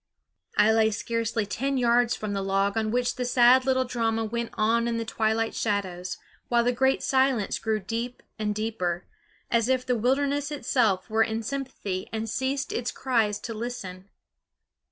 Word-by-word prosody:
I 210 +1 +6
lay 220 0 +4
scarcely 225 0 -1
ten 270 +6 -1
yards 240 -1 +3
from 210 -1 -4
the 195 - -1
log 195 +1 +1
on 220 -1 0
which 245 +2 0
the 250 - -1
sad 250 +1 +5
little 260 -1 +2
drama 225 -2 0
went 235 +1 -3
on 230 +2 +2
in 235 -1 -1
the 230 - -2
twilight 225 0 0
shadows, 185 -4 -2 0.3
while 235 -1 +3
the 245 - +2
great 265 +2 +1
silence 260 -5 +2
grew 220 -1 0
deep 230 +5 -4 0.2
and 210 -1 -1
deeper, 195 -5 -2 0.5
as 230 +1 +2
if 255 -1 +1
the 250 - +1
wilderness 280 +5 +1
itself 225 -10 +1
were 220 0 +1
in 225 0 0
sympathy 250 -7 -4
and 220 0 -3
ceased 265 +5 -2
its 240 0 -2
cries 225 -5 +1
to 230 - -5
listen. 205 -5 -6
230 Hz, 170 wpm, -26 LUFS, 215-250 Hz, 0.5 s, I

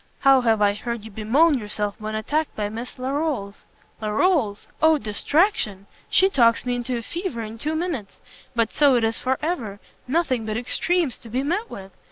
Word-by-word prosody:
How 270 -1 +6
have 225 -3 +3
I 200 0 +4
heard 230 +1 -5
you 220 - -9
bemoan 265 +9 +3
yourself 210 -1 -3
when 215 0 -4
attacked 295 +8 -1
by 205 -1 -2
Miss 230 +4 -7
Larolles!" 260 -6 -3 0.4
"Larolles? 215 - +1 0.2
O 315 0 +5
distraction! 220 - 0 0.2
She 380 - +5
talks 235 -11 +3
me 245 - 0
into 245 0 -2
a 230 - -5
fever 340 - -4
in 220 +1 -8
two 305 +5 -2
minutes. 315 - -3 0.4
But 230 -2 +1
so 285 -3 +5
it 235 - +2
is 225 0 0
for 260 +1 0
ever! 235 - -2 0.3
nothing 265 -5 +1
but 215 0 -2
extremes 310 +4 0
to 230 - -12
be 255 +4 -1
met 365 +10 -1
with! 195 0 -9
240 Hz, 185 wpm, -23 LUFS, 215-305 Hz, 0.4 s, How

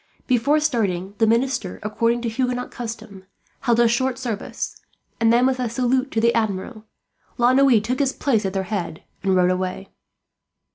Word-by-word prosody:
Before 270 +4 +2
starting 200 -10 -1
the 225 - +4
minister, 230 -4 0
according 230 +3 0
to - - -1
Huguenot 250 +2 -2
custom, 215 -5 -8 0.3
held 235 -3 +1
a 240 - +5
short 255 +2 0
service; 225 -5 -5 0.4
and 225 0 +4
then, 240 +2 +4
with 260 -1 +1
a 245 -2 -1
salute 255 +3 0
to 225 - -1
the 235 +1 +3
Admiral, 215 0 -2 0.5
La 245 0 +4
Noue 265 -4 +5
took 245 +5 -3
his 275 -2 +2
place 240 -6 0
at 190 -1 -2
their 195 -1 -1
head 185 -5 -4 0.2
and 190 -1 +1
rode 180 0 +3
away. 185 +1 -3
230 Hz, 175 wpm, -22 LUFS, 200-255 Hz, 0.5 s, a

